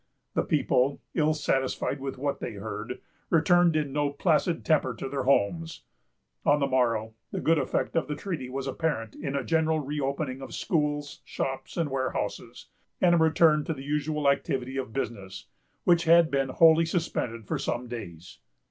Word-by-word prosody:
The - - +2
people, 135 +3 +1
ill 155 -1 +2
satisfied 135 -1 -1
with 135 0 -5
what 140 +2 -2
they - - -5
heard, 105 +3 -6 0.3
returned 175 0 +4
in 150 -3 -1
no 145 -1 +1
placid 165 +3 +1
temper 140 -6 +2
to 110 - -5
their 135 -1 -3
homes. 160 +6 +1 0.6
On 145 +1 +4
the 140 - +2
morrow, 115 -4 +1 0.2
the - - -3
good 165 -1 +3
effect 135 - -1
of 165 - +1
the 150 - -3
treaty 155 -10 -5
was 135 +1 -4
apparent 135 -6 -2
in 140 -1 -4
a 140 - -1
general 160 0 +1
reopening 140 -1 -3
of 135 - -7
schools, 145 -3 -1
shops, 135 +3 -4
and 160 -5 0
warehouses, 130 -1 -3 0.3
and 175 -1 +4
a - - +5
return 160 -1 +4
to 160 - -2
the 135 - -8
usual 150 +1 -1
activity 135 -2 0
of 130 -3 -3
business, 100 -7 -5 0.4
which 175 -1 +3
had 165 0 +6
been 135 -1 +1
wholly 165 +4 +5
suspended 125 - -2
for - - -2
some 125 +1 -2
days. 90 -8 -8
140 Hz, 170 wpm, -27 LUFS, 130-160 Hz, 0.6 s, had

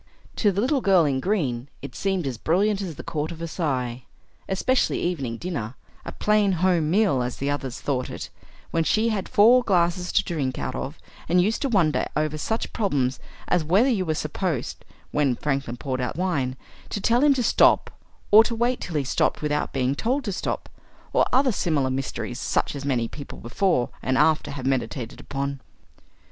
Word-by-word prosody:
To 205 - +3
the 195 +2 -1
Little 265 +3 +1
Girl 190 -6 +4
in 135 -2 +1
Green 140 - -1 0.2
it 140 -3 -7
seemed 190 -4 -1
as 125 -4 -4
brilliant 200 +5 +1
as 175 -5 -5
the - - -8
Court 155 +1 -3
of 170 - -7
Versailles; 140 -7 -2 0.5
especially 245 +7 +1
evening 140 -10 -2
dinner 135 -10 -4 0.3
a - - -6
plain 210 -2 +2
home 175 -3 +2
meal 190 - +3
as 125 0 -3
the 140 +1 -1
others 135 -3 -4
thought 130 -3 -2
it - - -7 0.4
when 165 - +1
she 220 +7 +2
had 205 -4 -2
four 240 +5 +6
glasses 180 -3 +1
to - - +4
drink 140 -7 -2
out - - -3
of 140 +4 -5 0.3
and 180 +2 +4
used 210 +5 +1
to 275 - 0
wonder 175 -9 +2
over 155 0 0
such 220 +9 -3
problems 140 - 0 0.3
as 175 - +2
whether 190 - +3
you 210 -7 +1
were 160 -3 -1
supposed, 155 -2 -3 0.3
when 140 -4 +2
Franklin 135 -3 -2
poured 130 -1 -3
out 125 +1 -2
wine, 145 -8 -1 0.3
to - - -3
tell 235 +6 +3
him 290 -2 +5
to 250 - 0
stop - - +4 0.4
or 215 +2 +9
to 230 0 -2
wait 240 +2 0
till 170 - -5
he 145 - +1
stopped 135 - 0
without 150 0 -1
being 130 0 0
told 255 - -1
to 205 - -3
stop; 190 - -3 0.5
and - - +4
other 260 +1 +4
similar 150 -9 0
mysteries, 130 -2 -4
such - - -1
as 140 - -5
many 125 -5 0
people 140 +4 -9
before 125 - 0
and 130 +1 0
after 155 +2 +3
have 135 -3 -6
meditated 120 -3 -2
upon. 140 0 -4
160 Hz, 190 wpm, -24 LUFS, 135-200 Hz, 0.5 s, or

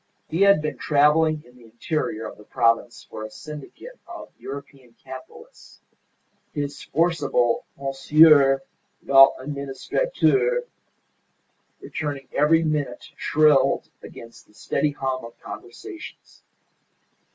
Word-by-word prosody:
He 165 +4 -2
had 200 -6 +5
been 150 - -4
travelling 150 +1 +3
in 125 +1 -20
the 120 - -17
interior 115 0 -3
of - - -12
the - - -13
province 115 +2 0
for 110 - -8
a 110 - -6
syndicate 150 - -11
of 345 -1 -10
European 135 -3 -10
capitalists. 460 - -13 0.7
His 145 -2 -4
forcible 145 -7 0
"Monsieur 140 0 +5 0.4
l'Administrateur" 145 - +2 1.2
returning 145 -4 -5
every 160 +3 +3
minute 145 -6 -3
shrilled 150 -3 +3
above 115 0 -12
the 105 - -26
steady 150 - -1
hum 135 -3 -3
of 115 0 -12
conversations. - - -11
140 Hz, 105 wpm, -23 LUFS, 130-155 Hz, 1.2 s, had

